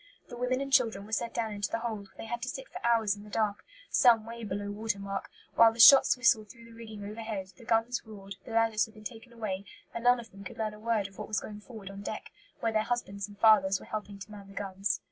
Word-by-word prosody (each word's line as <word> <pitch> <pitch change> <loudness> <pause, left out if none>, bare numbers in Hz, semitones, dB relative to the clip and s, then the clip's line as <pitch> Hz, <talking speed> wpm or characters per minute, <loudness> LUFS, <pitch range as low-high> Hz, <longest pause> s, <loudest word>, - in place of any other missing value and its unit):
The - - -7
women 250 +2 0
and 275 0 -4
children 225 -7 +3
were 215 - -13
sent 230 +1 -1
down 225 -2 -1
into 205 0 -2
the - - -1
hold, 220 -4 -4
where - - -28
they - - -7
had 235 +1 -4
to 255 - -3
sit 265 0 -6
for - - -9
hours 225 -3 +3
in 205 - -12
the 210 - -12
dark, 210 -1 -1 0.3
some 230 -4 +5
way 230 0 -8
below 205 0 -3
watermark, 200 -2 -3 0.2
while 230 -1 +7
the 230 - -12
shots 265 +3 +9
whistled 235 -5 +3
through 235 -2 -14
the 230 - -15
rigging 220 -3 -9
overhead, 210 -3 -5
the 230 - -15
guns 230 +1 +1
roared, 200 -3 -10
the - - -12
ladders 225 -1 +2
had 220 - -18
been 215 - -13
taken 230 +2 -9
away, 210 -5 -4 0.3
and 235 - -5
none 245 0 +5
of 230 -3 -10
them 195 0 -12
could 190 - -9
learn 215 -1 -2
a 210 - -12
word 220 -3 0
of 195 - -17
what - - -5
was 215 - 0
going 210 -1 -8
forward 210 -3 -10
on 195 0 -8
deck, - - -6 0.3
where 225 - +1
their 215 -1 +2
husbands 205 -4 -3
and 205 -1 -14
fathers 200 -3 +5
were - - -12
helping 210 -2 -5
to 195 +2 -10
man 200 -2 -10
the 195 - -13
guns. 195 0 -2
220 Hz, 265 wpm, -30 LUFS, 200-230 Hz, 0.3 s, shots